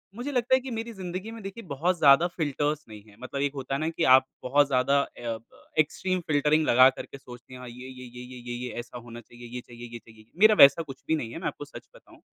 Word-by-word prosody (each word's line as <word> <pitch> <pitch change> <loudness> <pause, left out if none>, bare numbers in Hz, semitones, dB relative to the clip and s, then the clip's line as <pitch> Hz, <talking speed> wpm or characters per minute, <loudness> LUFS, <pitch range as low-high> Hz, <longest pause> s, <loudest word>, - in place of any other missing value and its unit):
मुझे 245 +5 -5
लगता 250 -1 +2
है - - +2
कि 260 0 -7
मेरी 230 0 -4
ज़िंदगी 190 +2 -6
में 225 0 -9
देखिए 195 +4 -8
बहुत 170 +6 0
ज़्यादा 145 +2 +6
फिल्टर्स 150 -2 -2
नहीं 105 -1 -10
हैं। 105 -1 -19
मतलब 140 +2 -5
एक 140 0 0
होता 135 0 -5
है - - -2
ना 155 +1 -1
कि 165 - -3
आप 130 0 +6 0.2
बहुत 145 +3 +3
ज़्यादा 135 +1 +2
अ, - - -4 0.2
ब 115 -1 -7
एक्सट्रीम 185 +4 0
फिल्टरिंग 150 +1 +2
लगाकर 130 +2 +5
के - - -11
सोचते 125 -1 -13
हैं, 130 - -9
हाँ, 125 - -9
ये 125 +2 -10
ये 130 -1 -10
ये 125 0 -11
ये 125 +1 -10
ये - - -3
ये - - -5
ऐसा 120 +1 -8
होना 120 0 -10
चाहिए, 120 +1 -14
ये 125 +1 -7
चाहिए 120 0 -12
ये 120 - -6
चाहिए, 110 -1 -18
मेरा 215 +1 +7
वैसा 140 +4 +7
कुछ 135 -4 -11
भी 160 - +2
नहीं 120 -7 -4
है, - - -7
मैं - - -3
आपको - - -6
सच - - -12
बताऊँ। - - -18
140 Hz, 265 wpm, -27 LUFS, 125-170 Hz, 0.2 s, मेरा